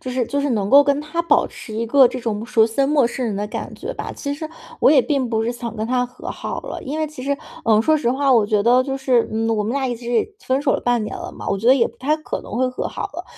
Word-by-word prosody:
就 255 - -6
是 250 -2 -1
就 285 0 -1
是 285 - -1
能 205 -4 0
够 280 +4 +8
跟 285 0 +1
他 305 +3 -3
保 335 - +3
持 220 - -11
一 230 +2 -2
个 265 +1 +6
这 250 - -5
种 220 -2 -3
属 230 -2 +3
于生 270 +5 0
陌 285 -5 +3
生 250 +1 -3
人 210 -3 -2
的 205 +1 -2
感 - - -6
觉 - - -6
吧。 - - -6
其 285 -1 -4
实 310 +1 -6 0.3
我 - - +6
也 290 - +6
并 270 -2 -1
不 220 0 0
是 235 - -1
想 235 -1 -6
跟 220 +1 -2
他 250 0 +1
和 250 +1 -10
好 - - -5
了， - - -7
因 290 +4 -4
为 310 - 0
其 290 -4 -9
实， 280 +1 -1 0.3
嗯， 220 -1 +4
说 310 +6 +3
实 240 -5 0
话， 275 +1 +2
我 230 -4 +5
觉 210 0 +1
得 245 +4 +4
就 270 0 -3
是， 255 -3 +2
嗯， 225 +1 0
我 210 - 0
们 220 +4 -2
俩 275 -1 0
一 245 - -2
直 240 - -2
分 260 +1 +1
手 280 - +1
了 - - 0
半 240 -3 +1
年 - - -5
了 - - -7
嘛， - - -7
我 195 - +1
觉 225 +5 0
得 260 - +8
也 235 - +3
不 - - -14
太 300 +4 0
可 310 - -5
能 215 - -7
会 255 0 +2
和 255 - -4
好 - - -6
了。 - - -6
250 Hz, 335 characters per minute, -21 LUFS, 225-280 Hz, 0.3 s, 够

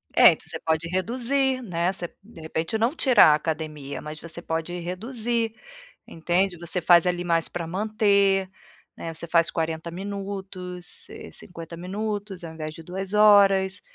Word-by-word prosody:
É, - - +9
então - - -7
você - - -6
pode 160 +1 0
reduzir, 255 +8 0
né. 175 -4 -1
Você 175 -3 -5
de 195 -6 -14
repente, 160 +6 -2
não 230 +7 +1
tirar 245 - +6
a - - +5
academia, 150 -3 -4
mas 150 0 -8
você 170 +1 -7
pode 165 +2 -3
reduzir, 225 +5 -2 0.5
entende. 175 +3 0
Você 170 +1 -1
faz, 170 0 +6
ali, 175 0 0
mais 165 -2 +1
pra 170 -2 -5
manter, 200 -1 +2 0.5
né, 165 - -5
você 165 +1 -7
faz 170 0 +3
40 160 0 -3
minutos, 190 -2 -6
eh, - - -10
50 170 -1 -9
minutos 200 +1 -4
ao 160 -1 -7
invés 155 -1 -6
de 165 - -10
2 190 +3 -5
horas, 200 -2 +5
180 Hz, 160 wpm, -25 LUFS, 165-205 Hz, 0.5 s, É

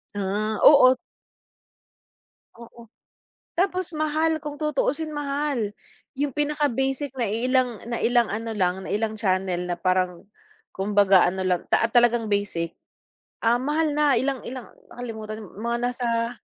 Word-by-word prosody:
Ah, 205 +2 -1
oo. 260 -3 +8 1.6
Oo. 235 -1 -14 0.7
Tapos 370 -2 0
mahal, 310 +1 0
kung 295 -1 -6
tutuusin 305 0 -1
mahal. 280 -7 -2 0.4
Yung 285 -1 -1
pinaka 295 0 0
basic 270 +2 -1
na 235 -4 0
iilang 245 +1 0
na 235 -1 -3
ilang 240 -2 +3
ano 225 +1 -3
lang, 185 0 0
na - - -7
ilang 220 +1 -1
channel 185 -2 0
na 175 - -1
parang, 185 -1 0 0.5
kumbaga 195 -2 +4
ano 190 +1 -3
lang 180 -2 +1
ta 230 - +2
talagang 240 -2 +3
basic, 190 -5 -1 0.7
ah, 230 +1 +3
mahal 295 +3 0
na 290 -5 +3
ilang 265 0 -2
ilang 255 -1 -7 0.2
nakalimutan 220 -3 -7
mga 230 +4 -4
nasa 240 -1 -1
235 Hz, 130 wpm, -24 LUFS, 205-280 Hz, 1.6 s, oo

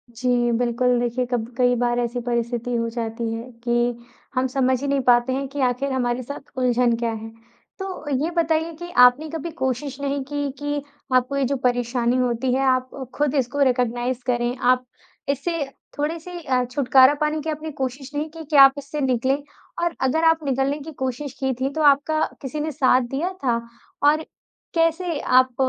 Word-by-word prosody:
जी, 245 0 +1
बिल्कुल, 245 +1 +1
देखिए, 245 +1 0
कब 235 -2 -1
कई 245 -1 +3
बार 240 0 +1
ऐसी 240 0 -1
परिस्थिति 235 0 -1
हो 230 0 0
जाती 230 0 -3
है 225 0 -4 0.2
कि 240 0 0 0.3
हम 255 +1 +2
समझ 260 -1 +1
ही 285 - -2
नहीं 280 0 +1
पाते 240 +1 +4
हैं 275 +1 -2
कि 280 +2 -7
आखिर 255 +2 0
हमारे 250 -1 -1
साथ 285 +3 -8
उलझन 245 -2 +2
क्या 230 -1 -1
है। 225 0 -6 0.5
तो 375 -6 -5
ये 330 - -1
बताइए 325 0 +1
कि 345 0 -7 0.2
आपने 270 +6 +3
कभी 325 +1 -5
कोशिश 265 +1 -2
नहीं 280 0 -1
की 290 -1 -1
कि 290 0 -2 0.3
आपको 255 +2 +2
ये 275 - +1
जो - - +2
परेशानी 245 0 +1
होती 250 0 0
है। 265 - +1
आप 255 0 +1 0.3
ख़ुद 295 -1 0
इसको 270 +1 0
रिकॉग्नाइज़ 245 -1 0
करें 240 0 0 0.2
आप 255 0 +1 0.4
इससे 290 +3 -1 0.3
थोड़े 300 +3 -1
से 355 +2 -8
अ, 255 -5 +1
छुटकारा 260 +1 +5
पाने 305 0 0
की 320 - -4
आपने 310 0 -4
कोशिश 265 +2 -4
नहीं 300 +2 -2
की 325 +1 -9
कि 305 - -1
आप 270 - +4
इससे 285 +1 -5
निकलें। 265 +2 +1 0.4
और 345 -1 0
अगर 270 +5 +1
आप 325 -1 +4
निकलने 270 +2 0
की 305 +3 -8
कोशिश 260 +2 -3
की 265 -1 0
थी 265 - +1
तो 315 - -2
आपका 310 +3 0 0.2
किसी 280 +2 -5
ने 310 +1 -2
साथ 260 -3 +3
दिया 315 +7 -1
था? 235 -3 +1 0.4
और 305 +2 +4 0.5
कैसे 330 -1 +1
आप 255 -1 +3
260 Hz, 185 wpm, -23 LUFS, 245-290 Hz, 0.5 s, छुटकारा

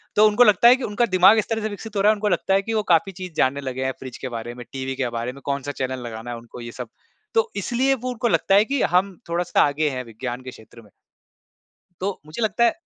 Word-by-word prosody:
तो 210 - +6
उनको 215 +3 +5
लगता 210 0 +5
है 245 - +8
कि 260 - -7
उनका 215 +2 +1
दिमाग़ 190 +4 +7
इस 215 - -3
तरह 225 -1 -1
से 215 - -2
विकसित 210 +1 -9
हो 200 - +1
रहा 210 +2 +5
है - - +1
उनको 210 0 -1
लगता 185 +1 +1
है 195 - +4
कि 225 +3 -4
वो 215 -1 +1
काफ़ी 195 +4 +2
चीज़ 185 -1 -6
जानने 140 +2 +2
लगे 130 -1 -4
हैं 130 - 0
फ्रिज 130 -2 -8
के 130 - -6
बारे 120 0 -6
में, 125 -1 -9
टीवी 135 0 -4
के 130 -2 -1
बारे 120 +2 -4
में, 140 - -13
कौन-सा 140 0 -2
चैनल 130 -2 -3
लगाना 115 +1 -7
है 120 - -5
उनको 115 +1 -11
ये 120 0 -7
सब, - - -8 0.4
तो 460 0 +2
इसलिए 245 +7 +1
वो 255 0 -5
उनको 245 0 -1
लगता 195 -3 +2
है 205 +2 +5
कि 275 +2 -1
हम 185 0 +2
थोड़ा-सा 175 +1 +1
आगे 150 +1 +1
हैं 130 -2 -4
विज्ञान 120 +2 -6
के 130 - -7
क्षेत्र 115 0 -15
में। 105 - -20 1.1
तो, 195 +1 -3
मुझे 155 +9 -7
लगता 225 +2 +1
है 235 +7 +2
180 Hz, 270 wpm, -23 LUFS, 130-215 Hz, 1.1 s, है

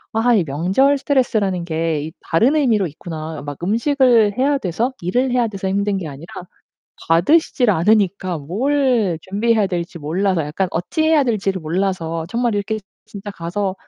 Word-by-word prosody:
'아 240 +2 +3
이 190 - +3
명절 190 - +2
스트레스라는 215 - 0
게 160 -2 -1
이 160 - -6
다른 235 - +2
의미로 225 - +2
있구나.' 160 0 -7
어 - - -9
막 145 -1 -6
음식을 230 0 +3
해야 280 +1 +2
돼서 220 +7 -1
일을 250 +9 0
해야 245 -2 +2
돼서 195 -2 -5
힘든 200 0 0
게 175 -4 -5
아니라 145 +4 -10 0.8
받으시질 245 - +3
않으니까 190 -2 +1
뭘 225 - 0
준비해야 210 +2 +1
될지 170 -1 -4
몰라서 170 +2 0
약간 175 +5 -2
어찌 175 - -1
해야 315 -3 +4
될지를 195 -5 -1
몰라서 165 -1 -2
정말 235 -2 0
이렇게 215 +2 -2 0.3
진짜 205 0 -8
가서 185 +3 -3
195 Hz, 345 characters per minute, -19 LUFS, 170-235 Hz, 0.8 s, 해야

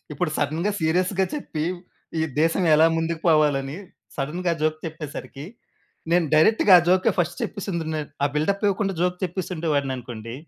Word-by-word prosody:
ఇప్పుడు 155 +2 -1
సడన్‌గా 160 +7 0
సీరియస్‌గా 180 +4 +1
చెప్పి, 160 - -4 0.6
ఈ - - +1 0.2
దేశం 165 +4 +2
ఎలా 160 +2 +6
ముందుకు 165 0 -2
పోవాలని, 145 -2 +2 0.4
సడన్‌గా 170 +5 -1
జోక్ 155 0 +1
చెప్పేసరికి, 150 -3 -7 0.7
నేను 170 -2 +3
డైరెక్ట్‌గా 195 +4 +5
ఆ 170 - 0
జోకే 185 +1 +4
ఫస్ట్‌ 175 0 -1
చెప్పేసుం‌దును 170 -6 -3
నేను. 150 -2 -5
ఆ - - +4
బిల్డప్పివ్వకుండా 195 +4 0
జోక్ 180 0 0
చెప్పే‌సుండే 175 -2 -3
వాడిననుకోండి, 125 -5 -4
165 Hz, 135 wpm, -23 LUFS, 150-180 Hz, 0.7 s, ఎలా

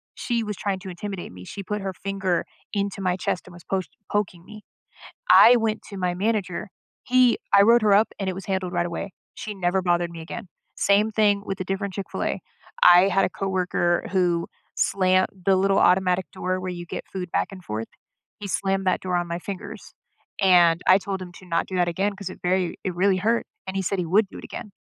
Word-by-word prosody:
She 235 -2 -1
was 210 -1 -4
trying 195 -2 -2
to 190 0 -8
intimidate 190 +1 -6
me. 90 0 -11
She 200 - -7
put 210 +2 -3
her 195 -1 -3
finger 190 -1 -2 0.3
into 200 -1 -2
my 180 -1 +1
chest 180 -1 -2
and 180 - -12
was 175 -1 -13
post 190 -2 -2 0.2
poking 190 -4 -1
me. 215 0 -12 0.7
I 245 +2 +9
went 225 -2 0
to 200 - -7
my 180 -2 -1
manager. 200 0 -1 0.4
He 255 -1 +4 0.2
I 200 - +8
wrote 235 +3 +5
her 210 -2 +5
up 210 +3 +4
and 195 - -2
it 185 - -1
was 190 0 -7
handled 190 -2 -2
right 175 -1 0
away. 180 +3 -5 0.2
She 215 - -6
never 190 0 0
bothered 175 -1 +1
me 170 -1 -9
again. 180 +5 -7 0.3
Same 205 +2 +3
thing 205 -2 +2
with 195 - -4
a - - -1
different 195 +1 -3
Chick-fil-A. 195 - -3 0.4
I 180 +2 +8
had 195 0 +2
a - - 0
coworker 180 -2 0
who 175 -3 +1 0.3
slammed- 185 -1 +2 0.2
the 195 -1 +5
little 195 +1 +2
automatic 180 0 +3
door 185 0 -2
where 185 0 -4
you 175 -1 -6
get - - -6
food 185 -2 -5
back - - +1
and 185 -2 -11
forth 110 +1 -4 0.5
he 205 - -5
slammed 195 0 -1
that 185 - +2
door 185 -1 -1
on 175 0 -1
my 170 0 -3
fingers, 190 +1 -8 0.5
and 175 -3 +5
I 185 - +7
told 195 -1 -4
him 180 -1 -9
to 185 - -15
not 165 -1 0
do 185 - -5
that 175 -1 +2
again 195 +4 -1
'cause 200 -1 -6
it 185 - -11
very 180 -1 0
it 185 - -2
really 190 +2 +3
hurt, 225 +5 +1 0.2
and 190 - -5
he 195 - 0
said 190 +1 -1
he 180 - -1
would 200 +5 +3
do - - -12
it - - -10
again. 210 - -8
190 Hz, 220 wpm, -24 LUFS, 180-200 Hz, 0.7 s, I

